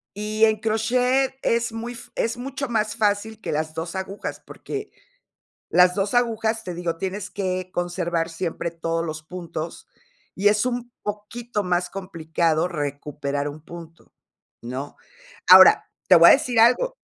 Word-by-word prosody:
y 215 +1 +2
en 220 -1 +2
crochet 250 +5 +1
es 235 0 +1
muy 230 +2 -5
f 235 - -12
es 230 +1 -1
mucho 275 +2 -4
más 215 -2 0
fácil 215 0 0
que - - -4
las 155 +1 -2
2 165 +2 -5
agujas, 190 +1 -5
porque 415 0 -7 0.8
las 180 0 +5
2 200 +2 -1
agujas, 225 -2 +1
te 180 - -5
digo, 170 -1 -3
tienes 195 +3 -4
que 185 -1 -3
conservar 175 -1 -1
siempre 165 0 -4
todos 165 0 -2
los 155 -1 -6
puntos, 170 -1 -7 0.5
y 200 +2 +2
es 210 +2 +2
un 245 -1 -3
poquito 210 +2 -4
más 180 -1 0
complicado 165 -3 -1
recuperar 145 -2 -3
un 150 +2 -10
punto, 165 0 -12 0.5
¿no? 130 +4 -6 0.5
Ahora, - - +8 0.2
te - - +8
voy - - +9
a - - +9
decir 250 -5 +1
algo 250 - +4
195 Hz, 150 wpm, -23 LUFS, 165-225 Hz, 0.8 s, voy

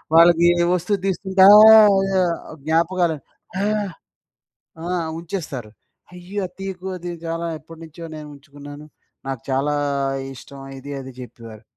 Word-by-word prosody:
వాళ్ళకి 170 0 +6 0.2
ఏ - - +3
వస్తువు 180 +3 -1
దీసుకుంటే 190 0 +1
ఆహ్, 215 -1 +8 0.7
జ్ఞాపకాలు 165 0 +1 0.4
ఆహ్ 210 -1 -1 1.0
ఆ! - - -6 0.3
ఉంచేస్తారు. 155 - -6 0.4
అయ్యో! 180 +3 -6
అది 180 - -18
తియ్యకు 190 -1 -6
అది 175 0 -7 0.2
చాలా 165 +1 -3
ఎప్పటినుంచో 165 +1 -12
నేను 150 -1 -9
ఉంచుకున్నాను. 145 +1 -12 0.4
నాకు 135 -4 -5
చాలా 135 +3 0 0.6
ఇష్టం. 135 +3 -13 0.2
ఇది, 140 +2 -10
అది 130 0 -9
జెప్పేవారు. 115 -3 -11
165 Hz, 115 wpm, -21 LUFS, 145-190 Hz, 1.0 s, ఆహ్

